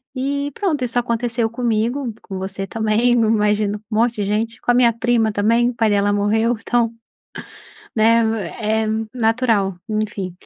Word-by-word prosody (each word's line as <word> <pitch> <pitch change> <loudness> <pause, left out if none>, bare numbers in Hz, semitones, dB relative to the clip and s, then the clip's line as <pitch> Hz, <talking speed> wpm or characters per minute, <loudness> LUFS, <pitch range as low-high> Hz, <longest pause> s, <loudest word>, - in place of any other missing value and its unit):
E 280 +2 -2
pronto, 320 -10 -1
isso 245 0 -2
aconteceu 235 -1 0
comigo, 235 +2 -1
com 195 - -7
você 195 +1 -4
também, 220 +3 +1
num 225 -2 +2
imagino 210 -1 +1
com 215 - -3
monte 230 +2 +2
de 210 - -2
gente, 220 +3 -2
com - - +1
a - - +3
minha 240 -1 +4
prima 230 -1 +1
também, 230 +4 +2
o - - -4
pai 225 -2 +2
dela 205 0 +2
morreu, 220 +4 +1
então, 235 0 0 1.0
né, 230 +1 +4 0.4
é 220 0 0 0.3
natural, 225 -5 +1
enfim. 215 -4 -3
225 Hz, 160 wpm, -20 LUFS, 210-240 Hz, 1.0 s, minha